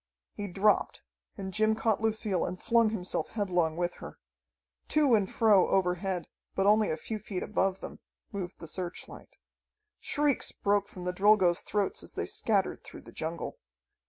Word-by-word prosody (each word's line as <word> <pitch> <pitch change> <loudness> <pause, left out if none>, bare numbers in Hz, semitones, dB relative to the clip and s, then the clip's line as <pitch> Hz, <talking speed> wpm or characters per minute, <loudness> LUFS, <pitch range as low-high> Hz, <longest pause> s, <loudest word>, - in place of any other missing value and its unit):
He 205 -1 -4
dropped, 200 +3 +1 0.3
and 190 -2 -5
Jim 215 +2 +3
caught 220 -1 0
Lucille 220 -4 +1
and 185 - -4
flung 230 -1 +3
himself 190 -4 -2
headlong 180 -6 0
with 175 0 -1
her. - - -9 0.7
To 295 -5 +3
and 205 -4 +2
fro 210 -5 +5
overhead, 180 -1 0 0.3
but 195 - +1
only 210 +1 +4
a 155 - -1
few 215 +7 -5
feet 195 -3 -4
above 195 -2 0
them, - - -8 0.3
moved 190 -3 -5
the 165 - -9
searchlight. 175 +2 -5 0.6
Shrieks 290 -2 +1
broke 200 0 +1
from 180 -1 -9
the 180 - -1
Drilgoes' 190 -3 +4
throats 205 -2 -1
as - - -10
they - - -2
scattered 200 -4 0
through - - -11
the - - -13
jungle. 165 +2 -5
195 Hz, 160 wpm, -30 LUFS, 180-215 Hz, 0.7 s, fro